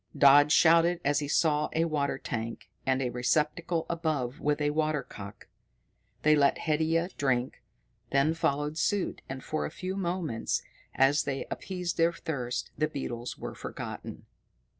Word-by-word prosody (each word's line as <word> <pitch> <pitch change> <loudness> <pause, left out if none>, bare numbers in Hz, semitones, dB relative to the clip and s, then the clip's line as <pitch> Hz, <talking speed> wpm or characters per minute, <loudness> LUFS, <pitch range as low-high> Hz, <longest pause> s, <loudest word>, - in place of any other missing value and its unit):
Dodd 145 +1 +7
shouted 170 +2 +5
as 145 +1 +3
he 145 - -3
saw 150 0 +2
a 165 +1 +2
water 145 -4 -1
tank, 115 -3 -5 0.2
and 130 0 +2
a 125 - -1
receptacle 150 +7 0
above 155 -7 -2
it - - -17
with 150 0 +1
a 145 0 +1
water 155 -1 0
cock. 100 -1 -10 0.8
They 155 0 +6
let 140 -1 +3
Haidia 160 +2 +1
drink, 130 -2 0 0.5
then 140 +3 +3
followed 150 -1 -1
suit, 205 -3 0
and 130 0 -6
for 155 - -2
a - - -2
few 185 +4 -5
moments, 175 -10 -2 0.3
as 135 +3 +4
they 135 -1 -2
appeased 180 -2 -4
their 165 +1 +3
thirst, 130 -7 -4
the 155 - +1
beetles 120 -5 -5
were - - -6
forgotten. - - -7
150 Hz, 155 wpm, -29 LUFS, 135-165 Hz, 0.8 s, Dodd